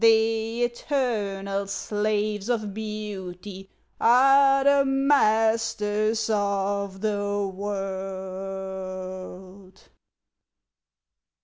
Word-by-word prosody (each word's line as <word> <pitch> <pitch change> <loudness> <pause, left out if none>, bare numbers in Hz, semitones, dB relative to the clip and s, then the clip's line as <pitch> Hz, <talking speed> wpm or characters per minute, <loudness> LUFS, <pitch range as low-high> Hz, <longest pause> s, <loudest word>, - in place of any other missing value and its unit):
The 225 +1 +3
eternal 205 -6 -1
slaves 210 +1 -1
of 215 -4 -1
beauty 200 -3 -6 0.3
Are 270 +3 +5
the 280 0 +5
masters 225 -5 +2
of 200 -2 -1
the 205 -1 -1
world. 190 -1 -6
205 Hz, 60 wpm, -25 LUFS, 195-225 Hz, 0.3 s, Are